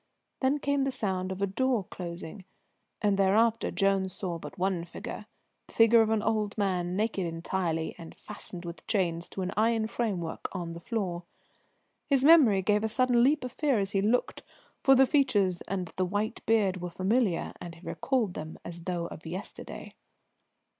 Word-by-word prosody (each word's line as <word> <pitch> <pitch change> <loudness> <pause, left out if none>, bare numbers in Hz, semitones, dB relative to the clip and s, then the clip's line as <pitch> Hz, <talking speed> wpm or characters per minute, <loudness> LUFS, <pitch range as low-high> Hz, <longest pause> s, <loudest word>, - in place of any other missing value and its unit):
Then 265 +2 +2
came 285 -1 0
the 270 - 0
sound 190 -6 -2
of 190 +1 -3
a - - +5
door 240 +3 0
closing, 175 +1 -7 0.6
and 200 -1 +2
thereafter 220 +4 +3
Jones 195 -2 +1
saw 175 -4 -4
but - - -9
one 185 -2 0
figure, 175 +4 -8 0.4
the - - -16
figure 230 0 +6
of 220 - +2
an 220 -1 +1
old 215 -2 0
man, 180 -3 0
naked 205 -3 0
entirely, 165 -1 -2
and 165 -1 -10
fastened 185 -4 -7
with 170 0 -8
chains 175 -5 0
to 190 - -4
an 185 - -2
iron 225 +1 +2
framework 200 -8 -3
on 175 -3 -4
the 170 - -7
floor. 180 -4 -3 0.8
His 275 -2 +3
memory 265 - +7
gave 210 +2 +2
a 220 - 0
sudden 245 +1 +3
leap 285 +3 +3
of 250 - -4
fear 280 -2 +1
as 195 -1 -1
he 195 - +1
looked, 225 +5 +1 0.4
for 270 -1 +6
the 265 +1 +6
features 210 - +2
and 185 -2 -2
white 205 +5 -1
beard 200 -5 +2
were 180 - -3
familiar, 190 +1 0
and 170 -1 -7
he 165 - -16
recalled 245 -8 0
them 155 -1 -7
as 170 0 -8
though 175 -2 -2
of 165 -1 -9
yesterday. 185 +5 -7
195 Hz, 175 wpm, -29 LUFS, 180-230 Hz, 0.8 s, memory